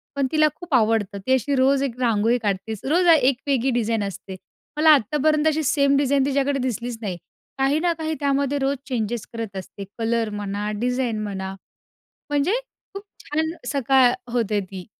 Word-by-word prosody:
पण 275 -2 +1
तिला 310 -1 +4
खूप 345 0 -9
आवडतं. 220 -3 +1
ती 260 - +4
अशी 260 +2 +1
रोज 270 +1 +3
एक 255 -2 -4
रांगोळी 230 0 +2
काढतेच. 205 +1 -2
रोज 345 +6 +2
एक 260 -1 +2
वेगळी 270 -2 +1
डिझाईन 225 -2 0
असते. 190 0 -8 0.4
मला 315 +1 +5
आत्तापर्यंत 300 +5 +1
अशी 315 0 +1
सेम 280 0 +3
डिझाईन 280 -1 +2
तिच्याकडे 280 0 0
दिसलीच 245 -1 -3
नाही. 185 -5 -4 0.4
काही 270 +3 +2
ना 345 0 +1
काही 315 -1 -3
त्यामध्ये 280 0 0
रोज 275 +1 0
चेंजेस 235 -3 -2
करत 225 -4 -5
असते, 190 +2 -8
कलर 230 -1 0
म्हणा 205 0 -3
डिझाईन 245 -2 -1
म्हणा. 190 -2 -4 0.8
म्हणजे 290 +6 +1 0.4
खूप 395 - -7 0.2
छान 315 +2 -1 0.2
सकाळ 265 -1 +4 0.2
होते 220 -4 0
ती. 185 -1 -9
255 Hz, 165 wpm, -23 LUFS, 220-280 Hz, 0.8 s, मला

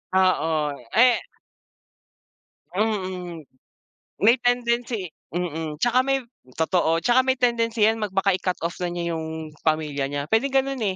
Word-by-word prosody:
Oo, 160 -5 +2 0.2
eh 245 +1 +6 1.6
Mm. 185 - -2 0.8
May 235 +3 +6
tendency 235 -6 0 0.2
mm, 160 -3 -3
tsaka 245 +1 +3
may 270 0 +1 0.3
totoo 165 0 +1
tsaka 255 +2 +4
may 260 0 +2
tendency 230 -3 +1
yan 220 +1 +3
mag 210 -3 -3
baka 195 +1 +2
i-cut 185 0 -1
off 170 - -2
na 180 - -1
niya 175 -1 -3
yung 160 -1 -6
pamilya 150 -3 0
niya. 140 0 -3
Pwedeng 265 +5 +2
ganun, 270 -1 +1
eh. 195 -4 -1
190 Hz, 135 wpm, -24 LUFS, 165-235 Hz, 1.6 s, eh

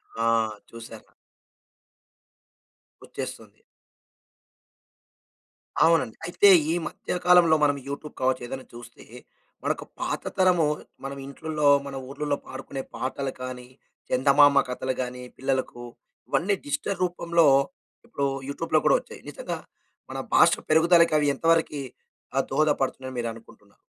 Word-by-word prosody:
ఆ! 115 - -2 0.5
చూసాను. 115 0 -11 2.0
వచ్చేస్తుంది. - - -8 2.3
అవునండి. 160 -9 +2
అయితే 185 +4 +4 0.2
ఈ - - +1
మధ్య 180 - -4
కాలంలో 175 -3 +6
మనం 145 -1 +3
యూట్యూబ్ 140 +2 -6
కావచ్చు, 130 0 +1
ఏదైనా 130 +1 -7
చూస్తే 120 0 -12 0.6
మనకు - - -1 0.2
పాత - - -2 0.2
తరము 180 -3 +4 0.4
మన 135 - -5
ఇంట్లల్లో 150 +1 -2 0.2
మన 140 - -7
ఊర్లలో 145 +1 -2
పాడుకునే 135 -1 -6
పాటలు 135 +1 -3
కానీ, 125 -1 -6 0.4
చందమామ 140 +2 +5
కథలు 130 +1 -2
గాని, 125 0 -5
పిల్లలకు 130 -2 -2 0.5
ఇవన్నీ 195 +3 +1
డిజిటల్ 285 -9 -2
రూపంలో 170 -2 +2 0.6
ఇప్పుడు 140 - -3 0.2
యూట్యూబ్‌లో 155 +4 0
కూడా - - +5
వచ్చాయి. - - -13
నిజంగా - - -5 0.5
మన - - -6 0.2
భాష - - +7 0.2
పెరుగుదలకి 170 +1 +5
అవి 150 - +2
ఎంతవరకీ 160 -1 +1 0.5
ఆహ్, 135 - +3
దోహదపడుతున్నాయి 135 -2 0
అని 125 - -8
మీరనుకుంటున్నారు. 115 -3 -8
140 Hz, 110 wpm, -25 LUFS, 130-165 Hz, 2.3 s, భాష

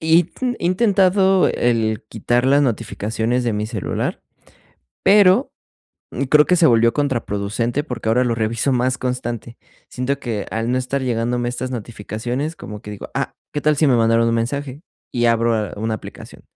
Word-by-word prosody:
intentado 190 +2 +2
el 115 -3 0
quitar 120 +3 0
las 140 +2 +4
notificaciones 115 -1 -1
de 120 - 0
mi 105 0 -2
celular, 110 -4 -3 0.8
pero 200 +4 +5 0.8
creo 150 +2 +5
que 180 - +3
se 170 - +5
volvió 115 -3 +4
contraproducente 120 -2 -1
porque 125 -6 -5
ahora 125 +3 +3
lo 120 - 0
reviso 115 +4 0
más 125 +1 +1
constante. 120 -2 -4 0.3
Siento 135 +2 -2
que 110 -6 -4
al 115 +2 -1
no 130 - +1
estar 130 +2 -2
llegándome 120 -1 -1
estas 125 +1 -4
notificaciones, 120 +5 -4
como 105 -1 -9
que 105 - -8
digo: 105 -1 -8
"Ah, - - -2 0.2
¿qué 145 - -2
tal 150 0 +2
si 155 - +3
me 135 - +4
mandaron 115 0 +3
un 115 - +1
mensaje?". 135 +5 -3 0.3
Y 120 -1 +1
abro, 115 -2 +2
eh, - - -11
una 110 +1 -2
aplicación. 110 - -10
120 Hz, 160 wpm, -20 LUFS, 115-145 Hz, 0.8 s, pero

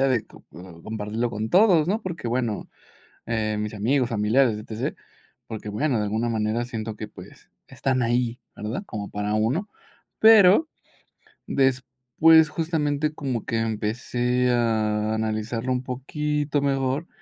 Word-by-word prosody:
idea 135 - +3
de 120 -4 +1
com - - -17 0.4
compartirlo 110 +2 -3
con 110 -1 -4
todos, 180 -5 +5
¿no?, 210 +4 0
porque, 170 -10 -5
bueno, 120 -3 -2 0.6
eh, 110 -2 -1
mis 105 0 -3
amigos, 125 +4 +1
familiares, 110 +2 +2
E-T-C, 110 +1 -4 0.5
porque, 110 -1 -6
bueno, 120 +5 0
de 105 - 0
alguna 110 +3 -1
manera 110 +1 -1
siento 110 -3 -5
que, 110 0 -6
pues, - - -14 0.2
están 130 -2 -1
ahí, 120 0 0 0.2
¿verdad?, 110 - -4
como 105 - -6
para 105 +1 -3
uno, 130 - 0 0.5
pero, 220 - +7 0.8
después, 130 +4 +3
justamente, 155 -2 -1
como 130 -7 -3
que 115 - -1
empecé 120 +3 0
a 110 -2 +1
analizarlo 110 +3 -2
un 125 0 -1
poquito 145 +3 -2
mejor, 135 +3 0
120 Hz, 135 wpm, -24 LUFS, 110-140 Hz, 0.8 s, pero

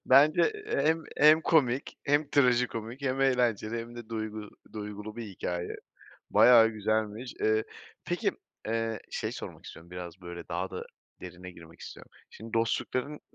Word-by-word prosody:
Bence 150 - +6
hem 165 - +1
hem 155 +2 +7
komik, 135 -5 +2
hem 145 +1 +2
trajikomik, 125 -2 +1
hem 135 -1 0
eğlenceli 120 -4 +2
hem 120 +1 -7
de 120 -2 -9
duygu 110 -2 -5 0.2
duygulu 105 0 -7
bir 115 - -5
hikâye. 90 -3 -4 0.5
Bayağı 115 -2 +7
güzelmiş. 110 +2 -2
Eee, 110 0 +2 0.4
peki, - - 0 0.4
eee, 115 -1 -1
şey - - -3
sormak - - -8
istiyorum, 85 +1 -11
biraz 90 0 -8
böyle, 85 -1 -8
daha 90 +2 -2
da - - -5 0.4
derine 90 0 -9
girmek 85 -2 -15
istiyorum: - - -10 0.2
Şimdi 110 0 -11
dostlukların, 125 +5 -1
115 Hz, 140 wpm, -29 LUFS, 105-130 Hz, 0.5 s, hem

